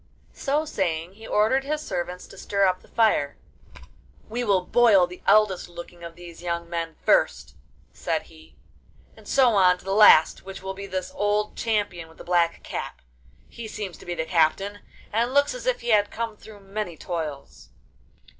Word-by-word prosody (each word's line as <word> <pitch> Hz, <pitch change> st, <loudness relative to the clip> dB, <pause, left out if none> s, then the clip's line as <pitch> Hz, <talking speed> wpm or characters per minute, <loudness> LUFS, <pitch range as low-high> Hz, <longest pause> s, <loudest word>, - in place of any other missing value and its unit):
So 295 Hz, +3 st, -1 dB
saying 175 Hz, -, -2 dB
he 220 Hz, +2 st, -12 dB
ordered 225 Hz, +6 st, +2 dB
his 300 Hz, +2 st, -2 dB
servants 180 Hz, +1 st, -4 dB
to 195 Hz, -, -15 dB
stir 200 Hz, -1 st, +1 dB
up 185 Hz, -1 st, +1 dB
the -, -, -20 dB
fire: 215 Hz, -11 st, +1 dB, 0.9 s
'We 240 Hz, +3 st, -2 dB
will 195 Hz, -4 st, +3 dB
boil 220 Hz, -6 st, +5 dB
the 180 Hz, 0 st, -12 dB
eldest 200 Hz, -4 st, +3 dB
looking 175 Hz, 0 st, -11 dB
of 170 Hz, -1 st, -8 dB
these 175 Hz, -1 st, -12 dB
young 170 Hz, -1 st, -3 dB
men 165 Hz, -1 st, -4 dB
first,' -, -, +2 dB, 0.4 s
said -, -, -2 dB
he, 80 Hz, -4 st, -18 dB, 0.6 s
'and 220 Hz, -2 st, -16 dB
so 265 Hz, -3 st, +4 dB
on 185 Hz, -4 st, +4 dB
to -, -, -19 dB
the 195 Hz, -, -1 dB
last, 200 Hz, -6 st, +6 dB
which 195 Hz, 0 st, -9 dB
will 190 Hz, 0 st, -4 dB
be 200 Hz, +1 st, -8 dB
this 185 Hz, -1 st, -4 dB
old 210 Hz, +1 st, 0 dB
champion 200 Hz, -7 st, -2 dB
with 160 Hz, -, -19 dB
the -, -, -10 dB
black 170 Hz, -1 st, +1 dB
cap. -, -, -6 dB, 0.4 s
He 230 Hz, -1 st, -8 dB
seems 205 Hz, -4 st, -6 dB
to -, -, -14 dB
be 175 Hz, -, -3 dB
the 160 Hz, -1 st, -2 dB
captain, 185 Hz, +5 st, +1 dB, 0.3 s
and 235 Hz, +4 st, 0 dB
looks 285 Hz, +7 st, +4 dB
as -, -, -7 dB
if -, -, +1 dB
he 240 Hz, -, -4 dB
had 205 Hz, -2 st, +4 dB
come 230 Hz, -1 st, -4 dB
through 210 Hz, -1 st, -14 dB
many 195 Hz, -3 st, -5 dB
toils. 155 Hz, -6 st, -6 dB
195 Hz, 185 wpm, -25 LUFS, 175-215 Hz, 0.9 s, last